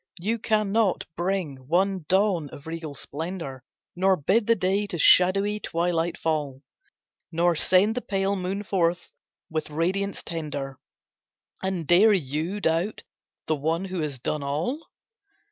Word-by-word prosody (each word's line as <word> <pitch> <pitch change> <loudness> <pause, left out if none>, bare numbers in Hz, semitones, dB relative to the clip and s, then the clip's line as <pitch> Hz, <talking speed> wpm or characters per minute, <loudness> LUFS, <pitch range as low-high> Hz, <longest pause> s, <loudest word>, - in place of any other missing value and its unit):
You 220 +6 -1
cannot 215 -2 +1
bring 175 -5 -1
one 185 +1 +1
dawn 190 -6 +2
of 140 - -12
regal 160 -2 -6
splendour, 150 -3 -5 0.3
Nor 190 +1 +3
bid 205 +9 +1
the 230 - +5
day 200 +1 0
to 180 - -4
shadowy 195 +6 +5
twilight 170 -2 -1
fall, 150 -4 -2 0.7
Nor 170 +1 +2
send 185 +7 +4
the 250 - -3
pale 195 -1 0
moon 190 +2 -3
forth 175 -3 0 0.4
with 155 -1 -2
radiance 185 +6 -1
tender— 145 -5 -5 0.8
And 190 -3 -2
dare 195 +7 +6
you 160 +3 -1
doubt 170 +3 0 0.4
the 155 - +1
One 160 +5 -1
who 185 -1 -4
has 150 -4 -2
done 150 +4 -2
all? 160 - -2
175 Hz, 135 wpm, -26 LUFS, 155-195 Hz, 0.8 s, dare